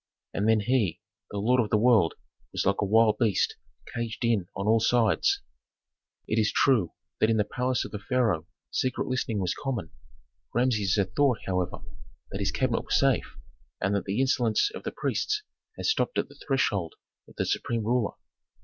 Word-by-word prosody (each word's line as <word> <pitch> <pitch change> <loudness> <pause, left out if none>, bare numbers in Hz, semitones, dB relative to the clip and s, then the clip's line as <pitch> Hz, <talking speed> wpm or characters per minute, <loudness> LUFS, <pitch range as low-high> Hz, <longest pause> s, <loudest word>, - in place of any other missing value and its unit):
And 105 +3 +1
then 110 -1 +4
he, 115 -5 +1 0.3
the 105 - -5
lord 120 +5 +3
of 105 - -2
the 105 - +3
world, 110 -7 +4 0.4
was - - -1
like 100 0 +2
a - - +2
wild 110 +1 +4
beast 110 -5 +2 0.4
caged 115 +1 -3
in 110 -6 +1
on 100 - -3
all 110 +1 +4
sides. 115 -1 +2 0.9
It 110 - +1
is 110 - +2
true 115 -11 +3 0.3
that 110 - +3
in 110 - +3
the 105 - +3
palace 125 +4 -1
of - - -8
the 105 - -5
pharaoh 110 -9 0 0.2
secret 130 0 -1
listening 125 -4 -1
was 90 -2 0
common. 125 - -4 0.6
Rameses 110 -6 +2
had 100 -3 -1
thought, 140 -5 +3
however, 90 -2 -2 0.5
that - - -4
his - - +1
cabinet - - 0
was - - +1
safe, - - +1 0.4
and 100 - 0
that 100 -2 -1
the 100 +4 -1
insolence 130 - +2
of - - -6
priests 425 0 -1 0.3
had - - -5
stopped 445 +3 +1
at - - 0
the - - -17
threshold 100 - 0 0.3
of - - -17
the - - -1
supreme 115 -2 -1
ruler. 120 -1 +1
110 Hz, 180 wpm, -27 LUFS, 100-125 Hz, 0.9 s, then